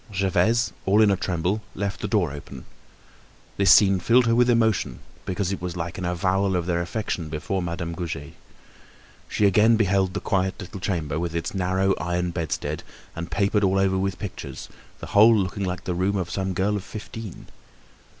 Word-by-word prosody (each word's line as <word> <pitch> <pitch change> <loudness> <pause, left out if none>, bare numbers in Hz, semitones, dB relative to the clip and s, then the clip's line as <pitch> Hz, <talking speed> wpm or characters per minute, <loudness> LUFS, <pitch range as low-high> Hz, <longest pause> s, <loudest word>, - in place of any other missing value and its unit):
Gervaise, 100 +3 +1
all 100 +2 +4
in 105 -2 +6
a - - +3
tremble 95 +2 -1
left 100 0 -3
the - - -2
door 100 -7 +1
open. 70 -3 -9 0.9
This 100 -2 +3
scene 95 +1 +6
filled 120 +7 +4
her 115 - +3
with 125 +1 +4
emotion 110 - +2 0.3
because 95 0 -1
it 100 - -4
was 90 -1 -4
like 85 +2 -4
an 90 - -3
avowal 95 +2 +1
of 90 -2 0
their 85 -1 0
affection 85 -3 -3
before 80 +5 -2
Madame 85 0 -4
Goujet. 80 -5 -5 1.0
She 105 - +1
again 105 +4 +5
beheld 95 -3 +1
the - - 0
quiet 95 0 0
little 100 +1 -7
chamber, 80 -6 -2
with 85 -1 -3
its 85 - -2
narrow 95 0 +1
iron 90 +1 -1
bedstead, 85 -3 -3 0.3
and 85 +1 -5
papered 100 +1 +1
all 95 0 +3
over 95 -1 +2
with 95 0 -1
pictures, 105 -3 -7 0.3
the - - -7
whole 110 +2 +7
looking 100 0 -1
like 90 -3 -4
the 90 - -2
room 95 +3 0
of 90 -2 -3
some 95 0 -2
girl 100 +3 +1
of 100 - -3
fifteen. 110 -2 -8
95 Hz, 185 wpm, -24 LUFS, 85-100 Hz, 1.0 s, whole